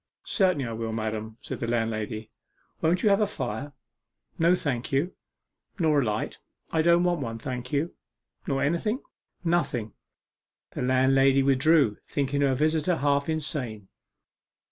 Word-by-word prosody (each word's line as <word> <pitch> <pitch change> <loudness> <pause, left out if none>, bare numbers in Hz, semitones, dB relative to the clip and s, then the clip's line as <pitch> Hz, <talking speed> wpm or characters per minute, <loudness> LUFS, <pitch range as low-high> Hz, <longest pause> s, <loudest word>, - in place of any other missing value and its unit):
'Certainly 185 - +2
I 115 - -4
will, 115 0 -3
madam,' 110 0 -3
said - - -5
the 120 - -2
landlady. 110 -1 -2 0.5
'Won't 170 +3 +2
you 215 - +5
have 200 +1 +4
a 210 - +3
fire?' 135 - -4 0.7
'No, 170 +2 +5
thank 130 -8 -2
you.' 145 +7 +1 0.6
'Nor 155 -5 +3
a - - +1
light?' 105 -2 -2 0.3
'I 160 - +2
don't 170 +1 +4
want 175 -2 +1
one, 115 -3 -4
thank 125 +1 -5
you.' 150 +4 0 0.5
'Nor 135 -1 0
anything?' 170 - 0 0.4
'Nothing.' 140 - 0 0.8
The - - -5
landlady 135 +1 +4
withdrew, 135 -3 +4
thinking 140 0 -1
her 135 -2 +3
visitor 155 +4 +2
half 140 0 +1
insane. 140 - -3
140 Hz, 145 wpm, -27 LUFS, 115-160 Hz, 0.8 s, you